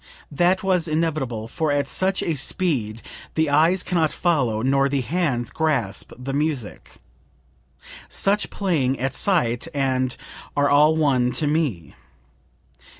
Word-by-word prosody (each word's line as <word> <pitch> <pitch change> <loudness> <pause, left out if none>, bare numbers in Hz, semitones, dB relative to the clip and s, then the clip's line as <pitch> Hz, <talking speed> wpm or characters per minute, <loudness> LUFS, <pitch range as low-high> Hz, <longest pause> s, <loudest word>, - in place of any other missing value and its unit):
That 175 +6 +2
was 185 -4 +1
inevitable, 155 -8 -1
for 160 +4 -1
at 145 -1 0
such 190 +6 0
speed 130 - -2 0.3
the 160 -2 +1
eyes 165 +5 +3
can 180 -2 -1
not 155 -2 +2
follow, 125 -11 0
nor 135 +1 +2
the 140 -1 0
hands 135 -4 -1
grasp, 135 -12 -1
the 130 +2 -5
music. 145 -6 -3 1.2
Such 200 +1 0
playing 145 -10 0
at 135 +1 -1
sight 130 - 0
and...are 135 +1 -1
all 150 +2 +5
one 130 -6 +2
to 155 - -1
me. 145 - -1
145 Hz, 125 wpm, -23 LUFS, 130-165 Hz, 1.2 s, all